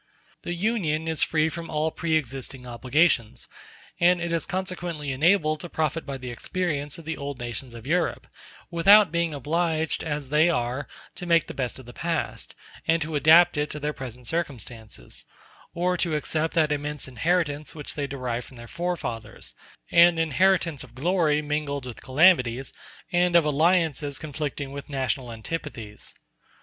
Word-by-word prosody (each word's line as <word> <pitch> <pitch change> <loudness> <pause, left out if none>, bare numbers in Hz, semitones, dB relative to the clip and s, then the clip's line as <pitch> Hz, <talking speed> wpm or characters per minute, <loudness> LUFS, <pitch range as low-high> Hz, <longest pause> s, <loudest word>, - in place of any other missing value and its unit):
The 175 - -4
Union 170 -6 0
is 160 -1 -1
free 155 -1 +3
from 165 +1 -5
all 155 +1 0
pre 160 -1 -1
existing 135 -2 -3
obligations, 125 0 +1 0.5
and 175 +1 +5
it 170 0 -3
is 165 -1 -1
consequently 180 -6 -3
enabled 155 +2 +3
to 175 - -8
profit 160 0 -1
by 140 -1 -4
the 125 -1 -6
experience 150 +1 -2
of 165 - -11
the 160 +1 -2
old 140 -1 -5
nations 120 +1 -5
of 115 0 -10
Europe, 170 +3 0 0.5
without 195 +2 +7
being 170 -1 0
obliged, 160 +3 0
as 145 -4 -3
they 155 +4 +4
are, 125 -2 -1 0.3
to 180 - -8
make 170 -1 +4
the - - -8
best 125 -3 -3
of 130 - -10
the 120 - -11
past, 165 +2 -3 0.3
and 165 +1 +4
to 155 +1 -6
adapt 160 +3 +6
it 150 0 0
to 150 - -5
their 150 +1 -2
present 125 -3 -8
circumstances; 120 -8 -4 0.5
or 180 +1 +1
to 170 -3 0
accept 155 +2 -1
that 155 -2 +3
immense 150 0 -2
inheritance 150 +2 -1
which 150 -2 -5
they 145 -2 -3
derive 125 -3 -3
from 130 - -14
their 120 0 -10
forefathers—an 170 +3 0
inheritance 165 -1 +2
of - - -15
glory 155 0 +2
mingled 145 -2 -2
with 120 -4 -8
calamities, 135 -4 +3 0.4
and 175 -1 +3
of 170 -3 +6
alliances 155 -2 +2
conflicting 145 -2 -4
with 140 +1 -8
national 130 -3 -2
antipathies. 115 -3 -6
150 Hz, 160 wpm, -26 LUFS, 135-170 Hz, 0.5 s, without